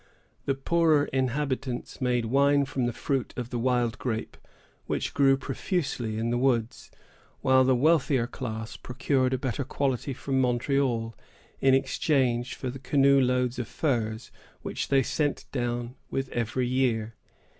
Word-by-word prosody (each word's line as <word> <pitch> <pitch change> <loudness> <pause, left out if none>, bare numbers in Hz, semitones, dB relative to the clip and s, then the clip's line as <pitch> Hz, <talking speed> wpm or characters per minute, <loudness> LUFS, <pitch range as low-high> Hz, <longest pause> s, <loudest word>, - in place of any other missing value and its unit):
The 135 - +1
poorer 155 +1 +3
inhabitants 130 -1 -2
made 125 -2 +1
wine 140 +4 +3
from 130 -2 -1
the - - 0
fruit 135 +2 -2
of 125 -1 -4
the 120 - -2
wild 120 -1 +1
grape, 115 -3 -3 0.5
which - - -2
grew 135 -1 +4
profusely 135 - -2
in 115 +1 -1
the 120 - +1
woods, 120 -3 0 0.5
while 130 0 +5
the 130 0 +3
wealthier 140 -2 +3
class 115 -3 -6
procured 130 0 0
a 130 - +1
better 130 +2 -2
quality 135 0 -1
from 135 0 0
Montreal, 120 -2 0 0.4
in 135 -1 +5
exchange 130 -3 +1
for 130 - -4
the 135 - -8
canoe 140 0 +4
loads 125 -1 +1
of 120 - -3
furs 110 -7 -2 0.3
which - - -3
they 135 -1 +3
sent 145 +3 -1
down 120 -1 -2 0.2
with 135 0 -2
every 120 +2 -1
year. 120 -4 0
130 Hz, 145 wpm, -27 LUFS, 120-135 Hz, 0.5 s, while